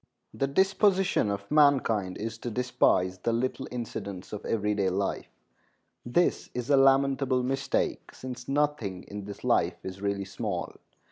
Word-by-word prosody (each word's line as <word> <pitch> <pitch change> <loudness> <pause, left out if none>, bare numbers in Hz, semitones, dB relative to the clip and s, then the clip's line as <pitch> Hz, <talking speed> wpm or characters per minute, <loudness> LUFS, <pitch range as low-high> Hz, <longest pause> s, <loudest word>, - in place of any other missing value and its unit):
The 135 - 0
disposition 190 - +2
of 100 +2 -4
mankind 130 -11 +3
is 115 +1 -5
to 120 - -4
despise 95 -6 +1
the 115 - 0
little 120 +3 -1
incidents 100 -6 -6
of 105 - -5
every 105 -2 0
day 100 -2 +1
life. 95 +2 -2 0.8
This 170 +9 +1
is 125 +3 -2
a - - +7
lamentable 135 -1 +3
mistake, 135 +2 -1
since 125 -1 -8
nothing 135 -10 -1
in 100 -1 -8
this 100 -1 -9
life - - +2
is 95 +1 -7
really 100 -1 -1
small. 100 -3 -4
120 Hz, 145 wpm, -28 LUFS, 100-135 Hz, 0.8 s, a